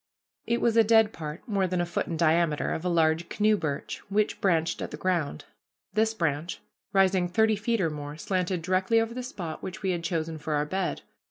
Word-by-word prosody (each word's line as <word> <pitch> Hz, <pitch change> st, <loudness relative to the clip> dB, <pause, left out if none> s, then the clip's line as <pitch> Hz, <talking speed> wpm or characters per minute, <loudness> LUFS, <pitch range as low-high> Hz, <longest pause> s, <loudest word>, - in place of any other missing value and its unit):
It 235 Hz, 0 st, +1 dB
was 230 Hz, -1 st, +2 dB
a 225 Hz, -, +8 dB
dead 220 Hz, 0 st, +4 dB
part, 155 Hz, +6 st, -7 dB
more 200 Hz, -4 st, +1 dB
than 180 Hz, 0 st, -1 dB
a 175 Hz, -, +1 dB
foot 170 Hz, -, -2 dB
in 165 Hz, -, -3 dB
diameter, 165 Hz, -1 st, +2 dB
of 160 Hz, -, -3 dB
a 180 Hz, -, 0 dB
large 165 Hz, 0 st, +2 dB
canoe 215 Hz, 0 st, +3 dB
birch, 155 Hz, -8 st, -3 dB
which 205 Hz, +1 st, 0 dB
branched 165 Hz, -4 st, +1 dB
at -, -, -3 dB
the -, -, -7 dB
ground. 170 Hz, -, -1 dB, 0.5 s
This 220 Hz, +1 st, +2 dB
branch, 165 Hz, -2 st, -1 dB, 0.3 s
rising 190 Hz, -2 st, +3 dB
thirty 220 Hz, +4 st, +3 dB
feet 225 Hz, +3 st, -1 dB
or 165 Hz, -4 st, +1 dB
more, 145 Hz, 0 st, -6 dB
slanted 180 Hz, -1 st, -1 dB
directly 185 Hz, +5 st, +2 dB
over 225 Hz, +1 st, -1 dB
the 250 Hz, -, -4 dB
spot 180 Hz, -11 st, -6 dB
which 190 Hz, +3 st, -7 dB
we 190 Hz, -, +1 dB
had 170 Hz, -2 st, -2 dB
chosen 165 Hz, -2 st, -2 dB
for 150 Hz, +1 st, -3 dB
our 145 Hz, 0 st, +1 dB
bed. 190 Hz, +5 st, -2 dB
180 Hz, 210 wpm, -27 LUFS, 160-210 Hz, 0.5 s, a